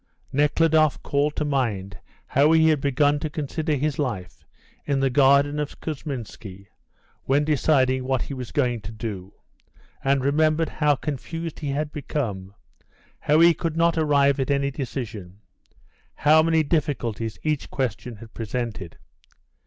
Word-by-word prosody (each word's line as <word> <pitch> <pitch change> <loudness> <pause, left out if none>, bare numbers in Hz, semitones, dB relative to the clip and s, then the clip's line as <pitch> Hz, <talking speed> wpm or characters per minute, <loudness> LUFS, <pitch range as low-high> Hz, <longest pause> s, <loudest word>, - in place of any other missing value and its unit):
Nekhludoff 155 +1 +2
called 145 +1 0
to 150 - -1
mind 105 -10 -2 0.3
how 145 +4 +3
he 160 0 +5
had 150 -3 +2
begun 145 +1 +2
to 155 - -3
consider 155 +1 -2
his 145 +1 -2
life 110 -11 -4 0.4
in 140 -2 0
the 135 -1 +1
garden 140 +2 +4
of 150 -1 -5
Kousminski 120 - -7 0.6
when 140 +2 +2
deciding 130 -3 +2
what 130 -1 0
he - - -6
was 125 -3 -6
going 125 -5 0
to 100 +2 -8
do, 105 -4 -6 0.7
and 135 -1 +1
remembered 155 +2 +2
how 150 -1 +2
confused 160 +4 -5
he 145 - -4
had 145 +2 -2
become, 105 -10 -4 0.6
how 150 +1 +3
he 170 0 +7
could 165 -1 -3
not 170 0 +3
arrive 145 -3 +3
at 135 - -1
any 140 0 +1
decision, 115 -9 -6 0.8
how 155 +2 +5
many 160 0 +2
difficulties 125 -8 -2
each 155 -2 -1
question 125 -2 -3
had 110 +1 -13
presented. 115 -5 -5
140 Hz, 145 wpm, -24 LUFS, 120-150 Hz, 0.8 s, he